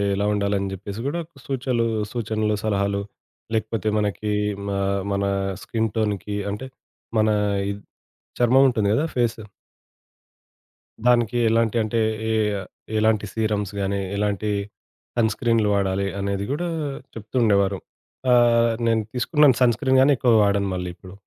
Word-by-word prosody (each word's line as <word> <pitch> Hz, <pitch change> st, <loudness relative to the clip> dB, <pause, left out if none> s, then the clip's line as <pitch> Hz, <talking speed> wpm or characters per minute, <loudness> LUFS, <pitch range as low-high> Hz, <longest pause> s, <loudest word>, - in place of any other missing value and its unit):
ఎలా 100 Hz, +1 st, 0 dB
ఉండాలి 100 Hz, 0 st, 0 dB
అని 95 Hz, 0 st, -3 dB
చెప్పేసి 100 Hz, +3 st, -7 dB
కూడా 155 Hz, +5 st, -1 dB
ఒక 155 Hz, -3 st, -21 dB
సూచలు 130 Hz, -3 st, -1 dB, 0.3 s
సూచనలు, 110 Hz, -2 st, -1 dB
సలహాలు, 100 Hz, -1 st, 0 dB, 0.5 s
లేకపోతే 110 Hz, -1 st, -2 dB
మనకి 105 Hz, +1 st, -1 dB, 0.5 s
ఆహ్, 100 Hz, 0 st, 0 dB
మన 100 Hz, 0 st, 0 dB, 0.4 s
స్కిన్ 115 Hz, -1 st, -1 dB
టోన్‌కి 105 Hz, -1 st, -1 dB, 0.2 s
అంటే 105 Hz, +6 st, -5 dB, 0.5 s
మన 110 Hz, -, +3 dB, 0.4 s
ఇద్ 100 Hz, 0 st, -7 dB, 0.6 s
చర్మం 125 Hz, +3 st, +5 dB
ఉంటుంది 110 Hz, -4 st, 0 dB
కదా! 145 Hz, -, +1 dB
ఫేసు. 115 Hz, -3 st, 0 dB, 1.6 s
దానికి 120 Hz, -1 st, +3 dB
ఎలాంటి 115 Hz, 0 st, +2 dB
అంటే 115 Hz, +2 st, -1 dB, 0.3 s
ఏ -, -, +1 dB, 0.7 s
ఎలాంటి 110 Hz, -1 st, +2 dB
సీరమ్స్ 105 Hz, -3 st, -1 dB
గాని, 100 Hz, 0 st, -1 dB, 0.2 s
ఎలాంటి 105 Hz, 0 st, -1 dB, 0.7 s
సన్‌స్క్రీన్లు 115 Hz, -1 st, +2 dB
వాడాలి 100 Hz, 0 st, 0 dB
అనేది 100 Hz, 0 st, -2 dB
కూడా 170 Hz, +5 st, -1 dB, 0.5 s
చెప్తు 110 Hz, +2 st, -10 dB
ఉండేవారు. 100 Hz, -3 st, +2 dB, 0.5 s
అహ్, 115 Hz, -1 st, +5 dB, 0.2 s
నేను 115 Hz, -1 st, +2 dB
తీసుకున్నాను 135 Hz, +1 st, +3 dB
సన్‌స్క్రీన్ 130 Hz, +2 st, +3 dB
గానీ, 140 Hz, +2 st, +5 dB
ఎక్కువ 120 Hz, -1 st, +3 dB
వాడను 100 Hz, -1 st, +1 dB
మళ్ళీ 90 Hz, 0 st, -3 dB
ఇప్పుడు. 90 Hz, +1 st, -13 dB
110 Hz, 125 wpm, -23 LUFS, 100-120 Hz, 1.6 s, చర్మం